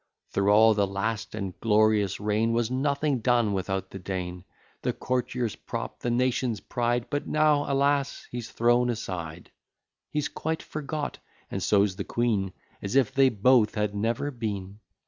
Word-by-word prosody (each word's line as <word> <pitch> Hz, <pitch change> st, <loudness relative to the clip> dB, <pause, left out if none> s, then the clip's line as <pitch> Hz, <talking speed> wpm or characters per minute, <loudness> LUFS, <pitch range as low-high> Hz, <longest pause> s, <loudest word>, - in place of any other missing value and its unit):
Through 100 Hz, 0 st, +1 dB
all 110 Hz, +2 st, +7 dB
the 100 Hz, -1 st, +1 dB
last 105 Hz, +3 st, -3 dB
and 100 Hz, -4 st, -4 dB
glorious 105 Hz, -2 st, +3 dB
reign, 105 Hz, +2 st, +1 dB
Was 120 Hz, 0 st, 0 dB
nothing 140 Hz, +1 st, +1 dB
done 115 Hz, -2 st, +2 dB
without 95 Hz, 0 st, -2 dB
the 95 Hz, -, -7 dB
Dean; 90 Hz, -1 st, -5 dB, 0.4 s
The -, -, 0 dB
courtier's 125 Hz, -2 st, -2 dB
prop, -, -, -6 dB
the 120 Hz, -, -2 dB
nation's 125 Hz, -2 st, +1 dB
pride; 120 Hz, 0 st, -1 dB
But 145 Hz, -1 st, -2 dB
now, 150 Hz, -2 st, +2 dB
alas! 140 Hz, 0 st, +1 dB
he's 120 Hz, -2 st, -5 dB
thrown 120 Hz, +1 st, +3 dB
aside; 90 Hz, -8 st, -5 dB, 0.6 s
He's 150 Hz, -1 st, -1 dB
quite 160 Hz, +1 st, -3 dB
forgot, 150 Hz, 0 st, -4 dB, 0.3 s
and -, -, -3 dB
so's 100 Hz, -2 st, +2 dB
the 100 Hz, -, -2 dB
queen, 105 Hz, -6 st, 0 dB, 0.3 s
As 100 Hz, +5 st, -3 dB
if 135 Hz, -5 st, +3 dB
they 135 Hz, -1 st, +5 dB
both 115 Hz, 0 st, +3 dB
had 105 Hz, -1 st, 0 dB
never 115 Hz, +7 st, -1 dB
been. 105 Hz, -5 st, -5 dB
115 Hz, 155 wpm, -27 LUFS, 100-130 Hz, 0.6 s, all